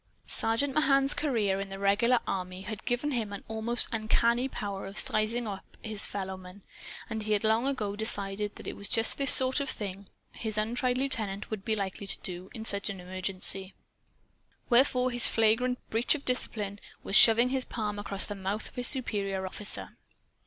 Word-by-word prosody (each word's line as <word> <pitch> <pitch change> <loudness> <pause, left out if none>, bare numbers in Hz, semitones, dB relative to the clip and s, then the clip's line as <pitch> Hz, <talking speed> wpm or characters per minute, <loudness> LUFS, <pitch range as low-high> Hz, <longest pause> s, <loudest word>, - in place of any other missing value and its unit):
Sergeant 245 +5 +1
Mahan's 275 -2 +4
career 215 -10 -1
in 195 0 -5
the 195 - -7
regular 205 +5 +2
army 185 -1 -4
had 210 +1 -8
given 245 +5 -1
him 225 -6 -2
an 200 - -7
almost 225 +2 +1
uncanny 235 +3 +1
power 200 -5 -5
of 195 - -9
sizing 220 +3 +1
up 200 -3 -8
his 215 -2 -1
fellowmen. 190 -1 -7 0.4
And 220 -1 -4
he 215 0 -1
had 205 - 0
long 220 +4 +2
ago 215 -7 -2
decided 205 -1 0
that - - -11
this - - -5
was 200 - -5 0.2
the 275 - -3
sort 260 0 +7
of 280 - -3
thing 200 -1 -6 0.2
his 220 -2 -5
untried 245 +4 0
lieutenant 220 -8 -2
would 215 -3 -5
be 220 +1 -1
likely 195 -1 -5
to - - +2
do, 180 +1 -6
in 220 - -7
just - - +8
such 200 +1 -3
an 195 -2 -6
emergency. 185 +1 +1 1.0
Wherefore 250 0 +3
his 240 -1 +8
flagrant 230 +3 +1
breach 230 +6 +2
of 285 - -8
discipline 210 -5 -2 0.3
in - - -6
shoving 230 +3 +6
his 260 0 0
palm 210 -4 -4
across 200 -1 0
the 205 - -4
mouth 195 +2 -4
of - - -24
his 245 -2 -2
superior 200 -7 -2
officer. 200 +2 -3
215 Hz, 180 wpm, -28 LUFS, 195-240 Hz, 1.0 s, just